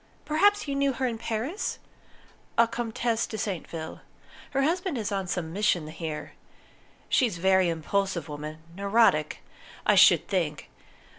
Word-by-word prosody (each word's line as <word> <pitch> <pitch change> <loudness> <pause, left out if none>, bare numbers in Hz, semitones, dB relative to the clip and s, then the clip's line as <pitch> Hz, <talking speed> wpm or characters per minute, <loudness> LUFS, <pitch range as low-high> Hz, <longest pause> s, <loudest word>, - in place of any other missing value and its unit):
Perhaps 410 +5 +3
you 280 - -1
knew 275 0 +1
her 260 +1 -2
in 230 -3 -2
Paris? 235 - -3 0.8
A 230 0 +6
Comtesse 230 0 -1
de 220 - -5
Saintville: 165 -6 -5 0.5
her 275 0 0
husband 345 0 0
is 220 -2 -3
on 195 -2 -2
some 170 -3 -3
mission 185 -6 +1
here. 155 -1 -6 0.7
She's 230 -9 +2
a - - -11
very 190 -1 +4
impulsive 170 +1 -1
woman 150 +1 -7
neurotic, 200 -6 +2 0.4
I - - +5
should - - +6
think. - - -2
205 Hz, 140 wpm, -27 LUFS, 170-250 Hz, 0.8 s, A